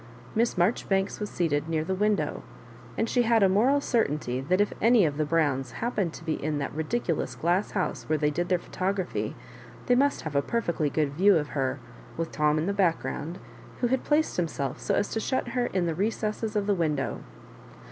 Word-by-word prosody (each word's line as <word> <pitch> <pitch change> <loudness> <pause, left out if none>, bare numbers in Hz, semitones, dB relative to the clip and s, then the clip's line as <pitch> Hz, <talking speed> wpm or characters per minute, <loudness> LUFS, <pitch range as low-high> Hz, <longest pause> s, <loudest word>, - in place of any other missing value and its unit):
Miss 230 -1 +1
Marjoribanks 195 +1 +1
was 210 -1 -3
seated 160 -3 -1
near 160 -1 0
the 190 +4 -2
window, 210 +2 0 0.6
and 225 - +1
she 245 - +2
had 230 -2 +4
a - - +7
moral 235 +9 +3
certainty 150 - 0
that 180 +8 +1
if 205 - +2
any 230 -3 +5
of 145 -2 -1
the 155 - +1
Browns 145 -6 0
happened 210 -7 -1
to - - -10
be 160 -3 -2
in 150 0 0
that 140 - -3
ridi 160 +10 -1
culous 145 - -3
glass 175 +5 +1
house 180 - -2
where 155 - +3
they 150 0 +1
did 175 +4 -2
their 180 - +3
photo 185 +2 -2
graphy, - - -4 0.5
they 250 - +3
must 280 +3 +2
have 155 -2 -6
a 140 - +4
perfectly 170 -6 -1
good 145 -1 0
view 190 +4 +5
of 150 -2 -2
her, 135 -1 -1 0.4
with 165 0 -2
Tom 150 0 +2
in 155 - 0
the 200 - 0
background, 170 -3 -1 0.4
who 245 - +3
had 260 +1 +1
placed 305 +1 +1
himself 145 -6 -2
so - - 0
as 205 - +1
to 225 - -1
shut 255 +2 -1
her 245 0 0
intd 185 -2 0
the 165 - 0
recess 210 +4 -1
of 205 -1 +1
the 205 - +2
window. 155 -7 -1
175 Hz, 210 wpm, -27 LUFS, 150-215 Hz, 0.6 s, a